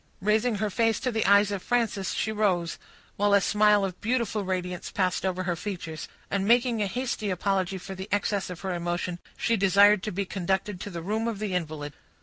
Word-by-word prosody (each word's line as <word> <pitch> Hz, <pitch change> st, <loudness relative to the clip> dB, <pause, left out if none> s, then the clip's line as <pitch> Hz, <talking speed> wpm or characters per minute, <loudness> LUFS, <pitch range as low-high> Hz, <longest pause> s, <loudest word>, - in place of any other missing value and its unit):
Raising 215 Hz, +4 st, +2 dB
her 210 Hz, 0 st, -1 dB
face 225 Hz, +1 st, +2 dB
to 255 Hz, -, 0 dB
the 220 Hz, -4 st, 0 dB
eyes 200 Hz, 0 st, +5 dB
of 200 Hz, -2 st, -3 dB
Frances, 225 Hz, -5 st, 0 dB
she 220 Hz, -, -1 dB
rose, 185 Hz, -6 st, 0 dB, 0.4 s
while 205 Hz, 0 st, +4 dB
a -, -, +6 dB
smile 210 Hz, 0 st, +3 dB
of 185 Hz, -2 st, -6 dB
beautiful 230 Hz, -2 st, 0 dB
radiance 180 Hz, -1 st, -3 dB
passed 185 Hz, -2 st, 0 dB
over 185 Hz, -1 st, -1 dB
her 175 Hz, -1 st, -1 dB
features; 170 Hz, -4 st, -6 dB, 0.2 s
and 200 Hz, 0 st, 0 dB
making 240 Hz, -1 st, +3 dB
a 205 Hz, -, +1 dB
hasty 235 Hz, -1 st, -2 dB
apology 190 Hz, 0 st, 0 dB
for 190 Hz, +1 st, -8 dB
the 190 Hz, +2 st, -7 dB
excess 205 Hz, -1 st, 0 dB
of 180 Hz, -2 st, -7 dB
her 190 Hz, -2 st, -2 dB
emotion, 175 Hz, 0 st, -3 dB, 0.2 s
she 230 Hz, -, +1 dB
desired 200 Hz, 0 st, +5 dB
to 215 Hz, -, -3 dB
be 200 Hz, +2 st, -2 dB
conducted 190 Hz, +1 st, -2 dB
to 205 Hz, -, -6 dB
the 170 Hz, -3 st, -6 dB
room 220 Hz, +5 st, -1 dB
of 230 Hz, -3 st, -2 dB
the 205 Hz, -2 st, -3 dB
invalid. 155 Hz, -4 st, -3 dB
200 Hz, 205 wpm, -27 LUFS, 185-215 Hz, 0.4 s, a